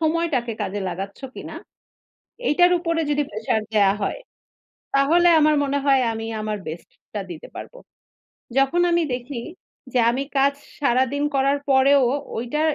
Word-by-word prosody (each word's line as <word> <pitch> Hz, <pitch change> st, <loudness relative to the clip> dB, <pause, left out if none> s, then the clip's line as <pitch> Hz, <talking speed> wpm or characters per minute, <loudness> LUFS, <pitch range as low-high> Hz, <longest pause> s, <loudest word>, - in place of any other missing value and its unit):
সময়টাকে 315 Hz, -7 st, 0 dB
কাজে 205 Hz, 0 st, -3 dB
লাগাচ্ছ 195 Hz, +3 st, -6 dB
কিনা, -, -, -8 dB, 0.9 s
এইটার 355 Hz, +4 st, +5 dB
উপরে 335 Hz, -1 st, -1 dB
যদি 295 Hz, 0 st, +2 dB
প্রেশার 220 Hz, +1 st, -1 dB
দেয়া 200 Hz, -3 st, +4 dB
হয়। -, -, -2 dB, 0.8 s
তাহলে 330 Hz, +6 st, +4 dB
আমার 305 Hz, 0 st, +4 dB
মনে 280 Hz, 0 st, 0 dB
হয় 270 Hz, -2 st, +4 dB
আমি 225 Hz, 0 st, -5 dB, 0.2 s
আমার 215 Hz, 0 st, -2 dB
বেস্টটা 170 Hz, +5 st, -8 dB
দিতে 160 Hz, -, -9 dB
পারব। -, -, -8 dB, 0.8 s
যখন 275 Hz, +6 st, +3 dB
আমি 340 Hz, -, +3 dB
দেখি 245 Hz, +1 st, -6 dB, 0.5 s
যে, 250 Hz, -, +3 dB
আমি 260 Hz, +3 st, -2 dB
কাজ 275 Hz, +1 st, +4 dB, 0.3 s
সারাদিন 265 Hz, +1 st, +1 dB
করার 275 Hz, +1 st, +2 dB
পরেও 270 Hz, +1 st, +5 dB, 0.3 s
ঐটা 245 Hz, +6 st, -2 dB
270 Hz, 135 wpm, -22 LUFS, 225-295 Hz, 0.9 s, এইটার